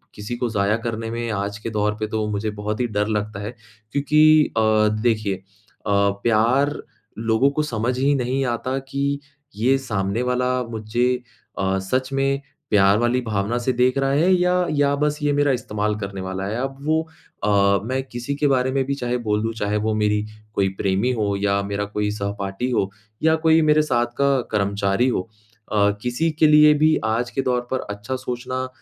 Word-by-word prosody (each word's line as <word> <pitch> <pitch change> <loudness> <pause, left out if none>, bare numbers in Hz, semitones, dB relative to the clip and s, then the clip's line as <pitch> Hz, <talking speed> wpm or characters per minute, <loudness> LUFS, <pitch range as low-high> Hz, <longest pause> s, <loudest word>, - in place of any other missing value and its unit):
किसी 105 +4 -5
को 120 -1 -1
ज़ाया 105 0 +1
करने 115 0 -3
में 115 0 -3
आज 100 0 -3
के 115 - -5
दौर 105 -1 0
पे 110 - -1
तो 110 0 -2
मुझे 105 +1 -2
बहुत 105 +1 -4
ही 120 - +1
डर 105 -1 -1
लगता 105 -1 -2
है 110 +4 -6 0.4
क्योंकि 150 +2 +4
अ, - - +4 0.4
देखिए 110 -4 +1 0.5
अ, - - -1
प्यार 110 +7 +2 0.4
लोगों 115 +4 +2
को 150 +1 -1
समझ 125 -2 -2
ही 140 +2 +3
नहीं 130 +1 0
आता 130 +3 -3
कि 140 +1 -1 0.4
ये 130 +5 +2
सामने 105 -3 -2
वाला 125 0 0 0.2
मुझे 110 +2 -1 0.5
अ, 95 0 +1
सच 130 +7 -1
में 135 0 +1 0.3
प्यार 100 0 +5
वाली 120 +2 +1
भावना 110 +1 -1
से 130 +2 0
देख 125 +2 +2
रहा 135 0 +1
है 165 +7 +3
या 180 0 +2
या 145 -1 +2
बस 150 +1 0
ये 145 - +2
मेरा 145 -1 +2
इस्तेमाल 105 -3 -2
करने 100 -2 -5
वाला 95 +1 -4
है, 110 +3 -3
अब 135 0 -4
वो 160 +1 +2 0.4
अ, 100 -1 +3
मैं 130 +2 -1
किसी 120 +4 -4
के 145 - +1
बारे 130 -1 +2
में 135 0 +1
भी 140 0 -1
चाहे 125 -2 -2
बोल 105 0 +1
दूँ, 115 - -1
चाहे 105 -1 -1
वो 110 - +1
मेरी 105 0 +1 0.3
कोई 100 -2 +1
प्रेमी 100 +6 +1
हो 105 -4 0
या 100 0 +2
मेरा 100 +1 -2
कोई 105 0 -2
सहपाठी 100 +2 -3
हो, 100 -5 +1 0.3
या 160 0 +5
कोई 160 0 +4
मेरे 155 0 +4
साथ 120 -5 +1
का 140 -2 +3
कर्मचारी 100 +3 +1
हो 105 - 0 0.5
अ, 105 -1 +3
किसी 125 +7 0
के 155 0 +3
लिए 150 0 +7
भी 155 0 +5
आज 115 +2 0
के 135 - -1
दौर 125 -2 0
पर 130 - 0
अच्छा 105 +6 -4
सोचना 130 0 -4
120 Hz, 190 wpm, -22 LUFS, 105-135 Hz, 0.5 s, लिए